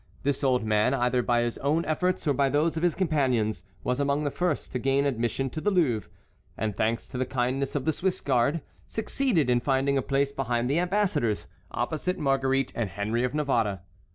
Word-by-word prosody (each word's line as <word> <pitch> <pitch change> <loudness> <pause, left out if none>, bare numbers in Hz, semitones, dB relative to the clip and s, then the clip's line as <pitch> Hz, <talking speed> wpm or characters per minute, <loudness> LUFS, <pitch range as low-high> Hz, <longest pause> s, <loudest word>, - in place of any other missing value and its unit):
This 140 0 0
old 130 -3 +2
man, 110 +4 +2
either 125 -1 +1
by 120 0 +2
his 120 -1 -3
own 155 +4 +1
efforts 180 +4 0
or 145 - +4
by 140 +1 +2
those 150 +4 +1
of 160 - -2
his 175 -2 +2
companions, 130 - +1 0.2
was 125 +2 -1
among 140 +1 +1
the 145 - -1
first 175 -2 -1
to 125 - -2
gain 135 +2 +2
admission 120 0 0
to 155 - -4
the 205 - +2
Louvre, 150 - +1 0.5
and, 105 -2 -2
thanks 115 +2 0
to 125 - -5
the - - +2
kindness 130 +2 -1
of 135 -2 -1
the 160 - +2
Swiss 185 +4 -1
guard, 140 +4 +1 0.3
succeeded 220 - 0
in 125 -1 +3
finding 135 +1 +1
a - - 0
place 140 +1 0
behind 125 -2 -1
the 155 - +2
ambassadors, 175 - 0 0.2
opposite 180 +4 -2
Marguerite 135 -3 +1
and 115 -4 -1
Henry 105 +6 -1
of 125 +3 -1
Navarre. 115 -10 0
135 Hz, 200 wpm, -27 LUFS, 120-150 Hz, 0.5 s, or